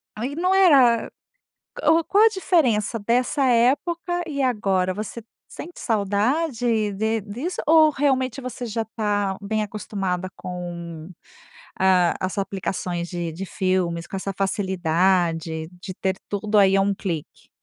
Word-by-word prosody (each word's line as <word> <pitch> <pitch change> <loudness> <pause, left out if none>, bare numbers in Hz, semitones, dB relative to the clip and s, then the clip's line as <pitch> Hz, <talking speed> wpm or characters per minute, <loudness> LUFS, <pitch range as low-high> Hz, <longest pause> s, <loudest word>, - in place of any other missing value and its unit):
Aí 250 +6 -4
não 365 +3 +1
era 275 -12 +5 0.7
o 325 +1 +4
qual 410 +6 +4
a - - +8
diferença 260 - +1
dessa 250 +6 +1
época 255 +8 +3 0.3
e 280 -3 -3
agora, 195 -7 +1
você 215 +3 -6 0.2
sente 350 - -10
saudade 225 +1 0
de 220 +2 -1
disso, 245 - -5
ou 315 0 +6
realmente, 265 -2 0
você 250 -1 -6
já 225 0 -2
tá 205 -3 0
bem 215 +2 -1
acostumada 195 -3 -3
com, 170 -2 -7 0.7
ah, 185 -2 +4
as 185 +2 -3
aplicações 185 -3 -3
de 175 -2 -4
de 175 +5 -6
filmes, 185 -3 -1
com - - -6
essa 195 +1 -3
facilidade 175 -4 0
de 185 -1 -7
ter 190 -1 0
tudo 210 +1 0
aí, 195 -1 +5
a - - +4
1 200 +1 +1
clique? 170 -6 -6
205 Hz, 135 wpm, -23 LUFS, 185-250 Hz, 0.7 s, a